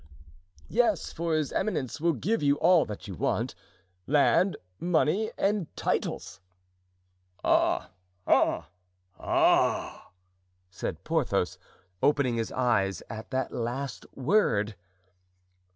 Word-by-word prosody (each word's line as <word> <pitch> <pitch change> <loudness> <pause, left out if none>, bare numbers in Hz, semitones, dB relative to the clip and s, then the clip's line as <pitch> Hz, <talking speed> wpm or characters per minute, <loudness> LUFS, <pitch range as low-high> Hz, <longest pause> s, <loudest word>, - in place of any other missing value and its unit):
"Yes, 220 -8 +1
for 165 -1 -1
his 155 -3 0
eminence 155 - -2
will 170 0 +3
give 205 - -1
you 140 -1 +3
all 175 +2 +4
that 105 -1 -8
you 100 - -6
want—land, 95 - 0 0.2
money, 175 +4 +1
and 200 -4 +1
titles." - - -2 1.0
"Ah! - - +2 0.3
ah! - - +2 0.5
ah!" - - +2 0.6
said 85 - -5
Porthos, - - 0 0.4
opening 140 -5 +2
his 115 - -2
eyes 100 -8 +1
at 110 0 -7
that 130 -1 -2
last 125 +4 -4
word. 125 - +2
140 Hz, 100 wpm, -28 LUFS, 115-170 Hz, 1.0 s, all